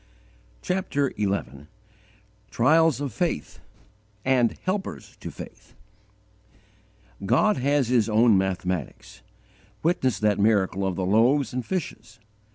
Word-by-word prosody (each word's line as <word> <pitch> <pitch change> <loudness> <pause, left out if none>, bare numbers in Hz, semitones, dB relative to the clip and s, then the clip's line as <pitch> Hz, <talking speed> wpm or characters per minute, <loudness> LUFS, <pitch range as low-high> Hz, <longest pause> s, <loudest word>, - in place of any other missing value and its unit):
CHAPTER 180 -7 -1
XI 95 -9 -3 0.8
TRIALS 155 +2 +3
OF 140 -6 -4
FAITH, 165 - -3 0.7
AND 125 -3 +2
HELPERS 185 - -4
TO - - -7
FAITH - - -12 1.5
GOD 175 - +3
has 135 -1 +1
His 120 -3 +2
own 110 0 +4
mathematics: 95 -8 -3 0.6
witness 145 -7 +1
that 105 -1 +1
miracle 100 -2 +2
of 95 - -2
the 95 - -2
loaves 120 +9 +2
and 125 0 -2
fishes. 115 - -5
115 Hz, 105 wpm, -25 LUFS, 100-145 Hz, 1.5 s, own